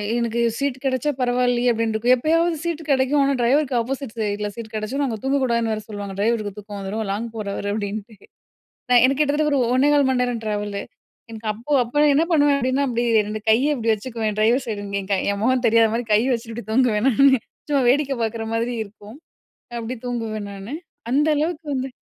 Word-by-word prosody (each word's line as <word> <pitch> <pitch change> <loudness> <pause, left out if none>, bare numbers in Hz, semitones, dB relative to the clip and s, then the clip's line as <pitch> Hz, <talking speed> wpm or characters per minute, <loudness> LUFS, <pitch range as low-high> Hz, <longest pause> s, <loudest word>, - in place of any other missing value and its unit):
எனக்கு 235 0 -1 0.2
சீட் 280 -2 -1
கெடைச்சா 265 +2 0
பரவாயில்லயே! 245 0 +2
அப்டின்ருக்கும். 230 +1 +1
எப்பயாவது 330 +5 +1
சீட்டு 335 -2 -3
கெடைக்கும். 275 +1 +3
ஆனா, 275 0 +2
டிரைவருக்கு 260 +2 +2
ஆப்போசிட் 265 0 -4
சைட்ல 210 -1 -1
சீட் 230 -2 -7
கெடைச்சிதுனா, 260 +7 -2
அங்க 225 -3 -3
தூங்கக்கூடாதுன்னு 245 -5 +1
வேற 215 - -4
சொல்லுவாங்க. 205 -2 -6
"ட்ரைவருக்கு 215 -1 0
தூக்கம் 205 0 -8
வந்துரும். 205 +3 -3
லாங் 215 +4 -2
போறவரு" 205 -1 -4
அப்படின்ட்டு. 210 +1 -5 0.8
நான் 245 -1 +6
எனக்கு 270 +2 +3
கிட்டத்தட்ட 300 +1 +1
ஒரு 280 - +3 0.2
1:15 285 +1 +4
மண்நேரம் 250 -2 0
டிராவல்லு. 205 -1 -3 0.5
எனக்கு 220 -1 -6
அப்போ 235 +8 -6
அப்போ 295 +6 +1
என்ன 315 +4 +4
பண்ணுவேன் 290 -2 +4
அப்டின்னா, 260 +2 +1
அப்டி 240 0 -1 0.2
ரெண்டு 215 +1 -4
கைய 275 +7 +3
இப்பிடி 230 -3 +1
வச்சுக்குவேன். 220 -1 -4
டிரைவர் 240 +5 +3
சைடு 210 -3 -4
இங்க 200 0 -2
என் 190 - -12
கை 190 - +2
என் 200 - -4
முகம் 255 +1 +2
தெரியாதமாரி 230 +1 +3
கைய 230 +5 +3
வச்சுக்ட்டு 230 -1 -6
இப்டி 210 - -21
தூங்குவேன் 235 -2 +2
நானு. 270 +2 +5 0.3
சும்மா 280 -3 +2
வேடிக்க 280 0 +1
பாக்குற 225 0 -2
மாதிரி 235 +2 -1
இருக்கும். 210 +3 -14 0.6
அப்பிடி 235 +2 -5
தூங்குவேன் 220 -4 -3
நானு. 200 +8 -7 0.4
அந்த 295 +3 +3
அளவுக்கு 315 +1 -2
வந்து 260 0 -2
235 Hz, 180 wpm, -22 LUFS, 215-270 Hz, 0.8 s, நான்